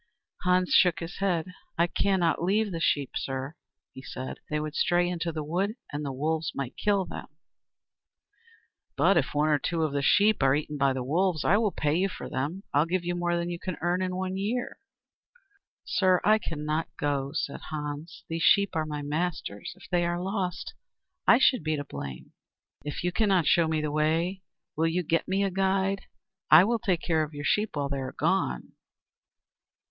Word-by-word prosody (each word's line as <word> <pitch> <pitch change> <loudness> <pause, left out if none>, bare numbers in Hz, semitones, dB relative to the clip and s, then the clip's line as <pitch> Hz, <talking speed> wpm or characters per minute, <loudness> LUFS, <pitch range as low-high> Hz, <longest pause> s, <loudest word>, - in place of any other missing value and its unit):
Hans 180 0 +2
shook 175 -2 +5
his 165 +1 -7
head. 185 -2 -1 0.2
"I 170 - +4
cannot 180 -2 +1
leave 205 +4 +1
the 165 - -3
sheep, 145 -4 +1
sir," 135 +3 -3 0.4
he 130 - -9
said. 130 0 -7
"They 150 - 0
would 150 0 -4
stray 175 +2 +2
into 175 -1 -2
the 155 -1 -4
wood, 185 +8 -1 0.2
and 145 +1 -3
the 140 - -3
wolves 160 +4 -1
might 135 -2 -4
kill 200 -2 +1
them." - - -8 1.7
"But 195 - +4
if 155 -3 0
one 150 +1 +2
or 150 -1 +3
two 165 -2 0
sheep 205 +8 +4
are 135 0 +4
eaten 150 0 -3
by 140 -1 +3
the 130 -1 -3
wolves, 165 +4 0
I 200 - +5
will 220 -1 +2
pay 150 -4 0
you 185 +4 +1
for - - -7
them. 155 +9 -3
I 145 - +4
will 155 - +3
give 175 0 -1
you 175 - -1
more 175 0 0
than 170 0 -2
you 170 - -5
can 185 -2 -4
earn 175 +3 0
in 185 0 -1
a 185 +1 -2
year." 210 +6 -3 1.1
"Sir, 185 -2 +3
I 215 +1 +5
cannot 155 -2 -2
go," 140 -4 -1
said 140 - -3
Hans. 150 +2 -6
"These 165 0 -3
sheep 200 +2 +4
are 155 -1 0
my 150 -1 -4
master's. 150 - -3
If - - -15
they 175 -1 +2
are 175 0 -1
lost, 185 -1 -3 0.5
I 235 - +8
should 255 -3 +4
be 155 0 0
to 145 - -3
blame." 70 - -8 0.5
"If 145 +2 -5
you 180 - +1
cannot 190 -3 +2
show 170 +1 +4
me 160 -1 0
the 150 -1 -2
way, 165 +5 0 0.3
will 160 +2 +2
you 175 +2 0
get 165 +1 0
me 195 +2 +1
a 195 - 0
guide? 195 +1 0 0.4
I 155 +3 +9
will 230 +3 +1
take 180 -5 0
care 160 -2 +2
of 150 -1 -4
your 145 0 -5
sheep 210 +6 +1
while 140 -1 -1
you 140 - -1
are 130 -1 -5
gone." 60 -1 0
170 Hz, 195 wpm, -28 LUFS, 150-185 Hz, 1.7 s, I